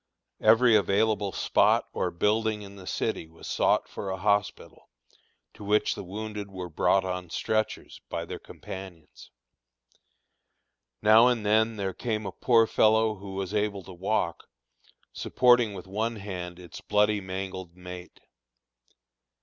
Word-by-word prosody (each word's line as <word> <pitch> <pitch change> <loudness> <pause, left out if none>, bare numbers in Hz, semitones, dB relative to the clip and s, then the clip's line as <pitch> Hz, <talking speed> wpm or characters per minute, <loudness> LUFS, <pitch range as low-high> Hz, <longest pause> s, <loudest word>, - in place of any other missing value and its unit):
Every 115 +2 +6
available 105 0 +2
spot - - +2
or - - -1
building 105 +3 0
in 100 0 -11
the 95 -2 -12
city 80 - -2
was 80 +1 -15
sought - - +2
for 100 - -6
a 95 - -3
hospital, 100 0 -1 0.6
to - - -12
which 105 +1 +2
the - - -7
wounded 105 +2 -6
were 90 -2 -7
brought 95 +4 +2
on 90 -1 -4
stretchers 110 +5 -2
by - - -3
their - - -7
companions. 95 -4 -11 1.7
Now 110 +3 +7
and 120 -4 0
then 110 +2 +3
there 95 -2 -3
came 110 -1 -3
a - - -4
poor 115 -2 +3
fellow 110 0 +3
who 95 0 -8
was 95 0 -4
able 105 -2 -1
to 95 - -11
walk, 95 +5 -2 0.7
supporting 120 -4 +3
with 90 - -8
one 110 +4 -2
hand 90 -4 -6
its 90 -2 -11
bloody, 105 0 +2
mangled 95 -2 -6
mate. 90 0 -10
100 Hz, 140 wpm, -27 LUFS, 95-110 Hz, 1.7 s, Now